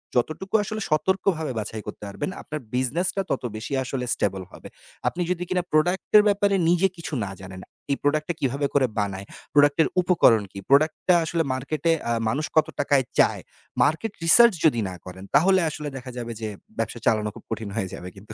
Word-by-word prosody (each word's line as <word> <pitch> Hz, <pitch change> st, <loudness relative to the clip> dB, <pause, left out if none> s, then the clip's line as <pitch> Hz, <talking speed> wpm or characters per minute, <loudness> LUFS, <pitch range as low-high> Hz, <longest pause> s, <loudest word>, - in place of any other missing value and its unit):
যতটুকু 155 Hz, -, -1 dB
আসলে 215 Hz, +1 st, -5 dB
সতর্কভাবে 160 Hz, -1 st, 0 dB
বাছাই 110 Hz, +1 st, -5 dB
করতে -, -, -8 dB
পারবেন, 100 Hz, -, -4 dB
আপনার 155 Hz, 0 st, -6 dB, 0.2 s
বিজনেসটা 170 Hz, +10 st, 0 dB
তত 130 Hz, -, -1 dB
বেশি 110 Hz, +5 st, -6 dB
আসলে 125 Hz, -1 st, -3 dB
স্টেবল 95 Hz, -1 st, -1 dB
হবে। -, -, -11 dB, 0.4 s
আপনি 175 Hz, -, -1 dB
যদি 180 Hz, 0 st, -1 dB
কিনা 180 Hz, -1 st, 0 dB
প্রোডাক্ট 175 Hz, +5 st, +1 dB
এর 210 Hz, -, +7 dB
ব্যাপারে 200 Hz, 0 st, +2 dB
নিজে 180 Hz, +2 st, +4 dB
কিছু 165 Hz, -1 st, -7 dB
না 95 Hz, -, -6 dB
জানেন। 95 Hz, 0 st, -9 dB, 0.3 s
এই 140 Hz, -, +1 dB
প্রোডাক্ট 155 Hz, +1 st, +1 dB
টা 175 Hz, -, +1 dB
কিভাবে 140 Hz, +2 st, 0 dB
করে 140 Hz, -2 st, +4 dB
বানায়, 100 Hz, -1 st, -3 dB, 0.3 s
প্রোডাক্টের 145 Hz, +2 st, +4 dB
উপকরণ 125 Hz, -, +4 dB
কী? -, -, -11 dB
প্রোডাক্ট 155 Hz, +3 st, +4 dB
টা 180 Hz, -, +6 dB
আসলে 165 Hz, 0 st, 0 dB
মার্কেটে 150 Hz, +5 st, -1 dB, 0.2 s
আ -, -, +1 dB, 0.2 s
মানুষ 150 Hz, +6 st, -1 dB
কত 155 Hz, 0 st, +4 dB
টাকায় 140 Hz, -2 st, +2 dB
চায়? -, -, +3 dB, 0.4 s
মার্কেট 160 Hz, +9 st, 0 dB
রিসার্চ 235 Hz, +7 st, +8 dB
যদি 120 Hz, -7 st, +4 dB
না 90 Hz, -, -7 dB
করেন, 95 Hz, +1 st, -9 dB
তাহলে 190 Hz, +3 st, +5 dB
আসলে 150 Hz, -1 st, -5 dB
দেখা 125 Hz, 0 st, -8 dB
যাবে 120 Hz, -1 st, -5 dB
যে 110 Hz, -, -3 dB, 0.3 s
ব্যবসা -, -, -3 dB
চালানো 110 Hz, -1 st, +2 dB
খুব -, -, -12 dB
কঠিন 110 Hz, -2 st, -4 dB
হয়ে 95 Hz, -5 st, -2 dB
যাবে 90 Hz, -, -7 dB
কিন্তু। 105 Hz, +3 st, -11 dB
145 Hz, 190 wpm, -24 LUFS, 115-175 Hz, 0.4 s, রিসার্চ